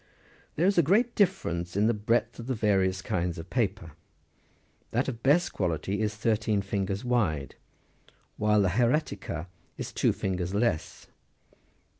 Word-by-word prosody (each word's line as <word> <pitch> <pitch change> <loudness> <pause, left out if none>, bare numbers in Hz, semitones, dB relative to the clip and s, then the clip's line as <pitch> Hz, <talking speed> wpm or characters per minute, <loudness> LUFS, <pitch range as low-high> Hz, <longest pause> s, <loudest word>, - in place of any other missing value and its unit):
There 165 - +1
is 195 -2 +4
a - - +8
great 215 - +2
difference 90 - 0
in 105 - +3
the 115 - +3
breadth 115 +2 0
of 115 - -7
the 130 - -1
various 95 -3 +1
kinds 90 -1 -1
of 80 +2 -9
paper. 100 -8 -1 1.0
That 120 +4 0
of 115 -4 -4
best 150 +7 +3
quality 90 -1 -2
23 110 - -1
is 105 -1 -1
thirteen 105 -1 0
fingers 100 +2 -2
wide, 90 - 0 0.8
while 105 -1 +3
the 95 - +2
hieratica 110 - 0 0.3
is - - -6
two - - +2
fingers 95 0 -2
less. 105 -7 -1
105 Hz, 150 wpm, -28 LUFS, 95-120 Hz, 1.0 s, a